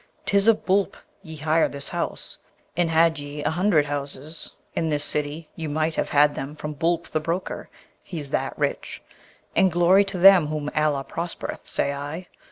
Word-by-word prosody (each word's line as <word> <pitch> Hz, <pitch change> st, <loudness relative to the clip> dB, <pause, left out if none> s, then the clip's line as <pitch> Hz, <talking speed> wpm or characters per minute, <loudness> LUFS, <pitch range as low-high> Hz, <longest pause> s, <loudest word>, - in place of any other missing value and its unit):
'Tis 200 Hz, +1 st, +4 dB
of 225 Hz, -2 st, +4 dB
Boolp 195 Hz, +1 st, +1 dB, 0.2 s
ye 160 Hz, -4 st, -9 dB
hire 155 Hz, +2 st, +2 dB
this 140 Hz, 0 st, -6 dB
house, -, -, -4 dB, 0.4 s
and 175 Hz, -1 st, +1 dB
had 165 Hz, -1 st, +3 dB
ye 145 Hz, +1 st, -6 dB
a 150 Hz, -, +1 dB
hundred 175 Hz, -3 st, +3 dB
houses 145 Hz, +2 st, -5 dB, 0.2 s
in 165 Hz, -, -1 dB
this 145 Hz, -1 st, 0 dB
city 150 Hz, +2 st, -3 dB
ye 160 Hz, -2 st, -4 dB
might 155 Hz, +2 st, 0 dB
have -, -, -1 dB
had 145 Hz, 0 st, +4 dB
them 140 Hz, +2 st, -6 dB
from 150 Hz, 0 st, -5 dB
Boolp 165 Hz, +3 st, 0 dB
the 155 Hz, -, 0 dB
broker, 170 Hz, +4 st, -4 dB, 0.3 s
he 170 Hz, -, -7 dB
that's 140 Hz, -2 st, -2 dB
rich; -, -, -3 dB, 0.5 s
and 190 Hz, -, +4 dB
glory 175 Hz, +4 st, +5 dB
to 195 Hz, -1 st, -4 dB
them 185 Hz, -3 st, +7 dB
whom 150 Hz, -1 st, -3 dB
Allah 150 Hz, -3 st, +1 dB
prospereth, 170 Hz, +4 st, -5 dB
say 140 Hz, -, 0 dB
I! 145 Hz, +5 st, -6 dB
160 Hz, 175 wpm, -24 LUFS, 145-175 Hz, 0.5 s, them